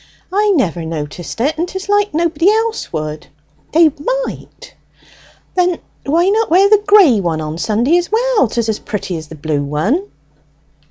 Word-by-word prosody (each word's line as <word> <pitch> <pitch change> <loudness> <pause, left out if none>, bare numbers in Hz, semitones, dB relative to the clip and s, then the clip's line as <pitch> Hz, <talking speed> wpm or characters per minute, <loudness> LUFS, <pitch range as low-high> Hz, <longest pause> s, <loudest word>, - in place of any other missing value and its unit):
"I 415 +1 +2
never 180 - 0
noticed 160 0 -6
it, 295 +5 0
and 345 - 0
'tis 380 +2 -7
like 410 0 +2
nobody 335 +3 +1
else 445 +1 -1
would." 155 -1 -5 0.4
"They 320 -1 +5 0.3
might." - - -10 0.8
"Then 360 -2 +1 0.3
why 335 +5 +2
not 440 +2 +1
wear 375 +5 +5
the 420 0 +4
gray 380 - +6
one 170 -4 -1
on 155 +1 -5
Sunday 235 - +2
as 350 - -5
well? 465 - +2
'Tis 230 +1 -2
as 220 -1 -1
pretty 195 -4 -4
as 160 -1 -7
the 160 - -10
blue 150 -1 -2
one." 190 - -1
295 Hz, 165 wpm, -16 LUFS, -, 0.8 s, gray